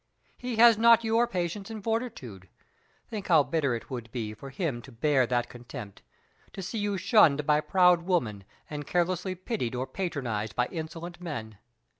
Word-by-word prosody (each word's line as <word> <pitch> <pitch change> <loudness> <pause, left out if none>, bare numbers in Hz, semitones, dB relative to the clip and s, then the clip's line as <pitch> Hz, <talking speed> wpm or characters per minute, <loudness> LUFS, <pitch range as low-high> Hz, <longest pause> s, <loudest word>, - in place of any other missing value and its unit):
He 250 -1 -4
has 230 -1 +7
not 230 0 +6
your 230 +2 +2
patience 185 +2 -3
and 220 -2 -7
fortitude. 165 - -4 0.6
Think 210 -3 -5
how 160 -5 +6
bitter 140 -2 0
it 115 - -8
would 120 -3 -6
be 110 -4 -4
for 135 +6 -10
him 135 -3 -3
to 130 - -13
bear 130 +1 +2
that 120 -1 0
contempt 120 -4 -10 0.5
to 195 - -6
see 215 +5 -4
you 205 -1 -1
shunned 155 - +4
by 150 0 +3
proud 180 -1 +4
women, 125 - -1 0.2
and 145 -1 -6
carelessly 180 +1 0
pitied 185 - -3
or 125 +1 -2
patronized 125 - -3
by 125 - +2
insolent 170 +1 -6
men. 110 - -6
160 Hz, 170 wpm, -28 LUFS, 125-195 Hz, 0.6 s, has